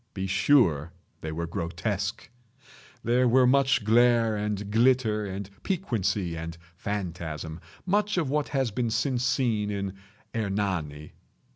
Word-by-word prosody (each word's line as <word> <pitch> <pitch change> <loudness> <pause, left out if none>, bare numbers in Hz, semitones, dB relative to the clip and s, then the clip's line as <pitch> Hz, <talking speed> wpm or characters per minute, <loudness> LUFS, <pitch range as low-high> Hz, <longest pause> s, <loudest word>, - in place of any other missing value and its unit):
Be 95 -1 -2
sure 90 - +3 0.3
they 80 - -4
were 85 +2 -3
grotesque. 95 +4 -3 0.8
There 125 +2 +3
were 125 +2 +5
much 130 -2 +3
glare 115 0 +4
and 105 -1 -3
glitter 115 -2 +3
and 95 0 -5
piquancy 105 - -1
and 80 0 -6 0.2
phantasm—much 85 - -3
of 165 -5 +1
what 145 +2 0
has 135 -5 0
been 120 +3 -1
since 125 +2 0
seen 120 -5 +1
in 100 -2 -3 0.4
"Hernani." 95 -9 -2
105 Hz, 120 wpm, -27 LUFS, 90-125 Hz, 0.8 s, were